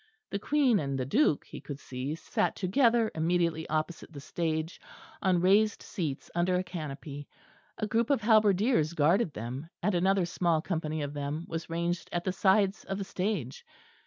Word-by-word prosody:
The 200 - -1
Queen 265 -3 +3
and 140 -3 -2
the 130 - -1
Duke, 160 - +2
he - - -9
could 145 -1 -7
see, 135 +3 -4
sat 165 - -1
together 230 +3 +3
immediately 165 0 0
opposite 155 +2 -2
the 145 - -8
stage, 160 +2 -3 0.4
on 185 -3 +2
raised 205 +3 +3
seats 150 -7 -4
under 175 +2 +1
a 180 - +1
canopy; 145 -5 -7 0.5
a - - -1
group 225 +2 +1
of 280 -5 +2
halberdiers 210 - +3
guarded 170 +5 +3
them, 125 +8 -5
and 210 - +2
another 190 +1 +2
small 170 -2 +1
company 155 -2 -2
of 145 0 -4
them 145 +3 -3
was 165 0 -5
ranged 170 +1 -2
at 175 0 -1
the 185 - -1
sides 195 +1 +3
of 195 - -3
the 200 - -3
stage. 185 - -3
175 Hz, 170 wpm, -30 LUFS, 155-200 Hz, 0.5 s, Queen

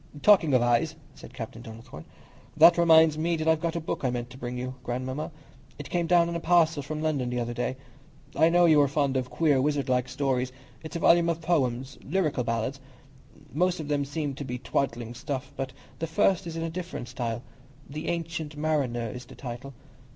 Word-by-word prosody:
"Talking 175 -9 +6
of 125 - +4
eyes," 120 +7 +2 0.2
said - - -13
Captain 115 -2 -7
Donnithorne, 110 - -11 0.5
"that 165 +2 +8
reminds 160 -2 +6
me 170 +2 +1
that 160 0 -3
I've 160 -1 +3
got 170 0 -1
a - - 0
book 160 - -4
I 130 - +2
meant 120 0 -4
to 130 - -11
bring 125 0 -4
you, 130 +1 -4
Godmamma. 130 +4 -3 0.5
It 145 - -9
came 175 -1 0
down 170 0 +5
in 170 - -3
a - - -1
parcel 165 -3 +3
from 155 +2 -5
London 140 -6 0
the 125 0 -2
other 120 0 -2
day. 125 +2 -2 0.6
I 160 +3 +5
know 175 +1 +5
you 155 -3 +6
are 140 - +4
fond 140 -1 0
of 130 -1 -1
queer, 145 -5 +2
wizardlike 130 -3 0
stories. 130 -2 -1 0.3
It's 160 +1 -9
a - - -1
volume 170 0 +5
of 165 -1 -1
poems, 135 -6 -1
'Lyrical 155 -6 0
Ballads.' 115 +3 -2 0.7
Most 180 +4 +1
of 150 -2 -5
them 145 -1 +1
seem 145 0 -3
to 140 - -6
be 125 -2 -4
twaddling 120 -2 -2
stuff, 130 +2 -5
but 135 -1 -4 0.3
the 165 - -2
first 180 +3 +2
is 165 - -6
in 165 - -2
a 165 - -2
different 175 -8 -6
style—'The 130 +5 -7
Ancient 160 -3 -3
Mariner' 135 -7 -1
is 125 0 -8
the - - -13
title. 125 +1 -7
145 Hz, 200 wpm, -27 LUFS, 125-160 Hz, 0.7 s, that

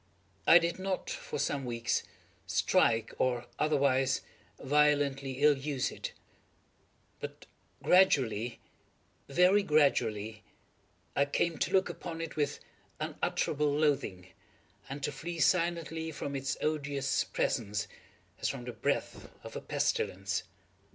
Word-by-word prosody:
I 165 - +10
did 170 +1 0
not, 190 - -2
for - - -5
some 140 - -1
weeks, 120 -1 -1 0.5
strike, 115 -1 +2
or 125 -1 +1
otherwise 135 -3 +2 0.4
violently 140 -1 +2
ill 150 -1 +7
use 135 -1 -2
it; - - -6 1.1
but - - -8 0.4
gradually—very 140 - +2
gradually—I 120 - -1
came 160 +3 0
to - - 0
look 190 -1 +4
upon 165 -2 -6
it 165 -1 -5
with 145 -2 -1 0.4
unutterable 150 0 0
loathing, 140 -12 0 0.6
and 140 +1 -6
to 150 - 0
flee 165 +5 -6
silently 165 -2 +1
from 140 -1 -5
its 135 0 -2
odious 145 -3 0
presence, 105 -4 -1 0.5
as - - 0
from 135 -3 -5
the 125 - -5
breath 110 - -2
of - - -9
a - - -4
pestilence. 95 0 -1
140 Hz, 110 wpm, -31 LUFS, 125-160 Hz, 1.1 s, I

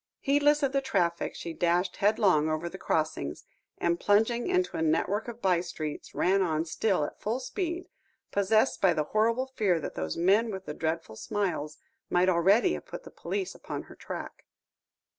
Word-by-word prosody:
Heedless 290 +1 +3
of 275 - +2
the 275 0 +1
traffic, 175 -11 0
she 170 - -6
dashed 175 +2 +1
headlong 195 -7 +3
over 155 +2 -1
the - - -8
crossings, 155 - -2 0.3
and 170 0 0
plunging 220 +4 +2
into 365 0 +1
a - - -2
network 165 +8 +1
of 235 0 -8
by 180 -3 +3
streets, 155 -4 -6
ran 195 +2 +3
on 160 -3 0
still 185 +1 0
at - - -9
full 225 +4 -1
speed, 345 +5 -3 0.4
possessed 215 +5 +2
by 180 -4 +4
the 155 - +1
horrible 230 +4 +2
fear 185 -6 +2
that - - -5
those 80 -1 -3
men 200 +7 +3
with 190 -2 -6
the 150 - -5
dreadful 160 -6 -3
smiles, 160 - -2 0.3
might 180 +1 +3
already 195 - +4
have - - -6
put - - -8
the - - -12
police 385 -2 -3
upon - - -6
her - - -14
track. - - -7
190 Hz, 180 wpm, -29 LUFS, 165-230 Hz, 0.4 s, by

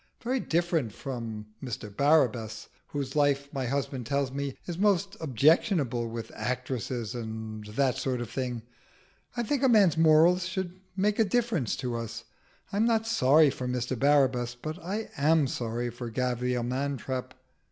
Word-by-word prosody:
Very 255 +3 0
different 165 - 0
from 115 -5 -5 0.2
Mr 115 -5 -6
Barabbas, 125 -7 +2 0.2
whose 140 -2 -4
life, 140 -1 +2
my 135 -3 -2
husband 135 -2 -2
tells 140 -1 0
me, 140 -1 -4
is 175 -1 -5
most 200 -1 +2
objectionable, 140 - +2
with 115 0 -6
actresses 125 -2 -3
and 110 -2 -6
that 125 +4 +1
sort 130 -2 -1
of 120 - -4
thing. 125 -3 -3 0.7
I 240 - +1
think 265 +4 0
a 265 - +4
man's 195 -9 +5
morals 165 +3 +5
should 185 -1 -4 0.2
make 205 +3 +1
a - - +7
difference 215 - 0
to 125 -2 -3
us. 115 0 -5 0.5
I'm 210 +3 +2
not 225 -1 +2
sorry 155 - +5
for 125 - -5
Mr 125 0 -1
Barabbas, 130 -4 +3
but 155 +7 -7
I 205 +5 -4
am 155 +2 +4
sorry 120 -1 -2
for 120 +1 -6
Sir 115 - -8
Gavial 125 0 0
Mantrap." 130 0 -3
135 Hz, 155 wpm, -28 LUFS, 120-165 Hz, 0.7 s, a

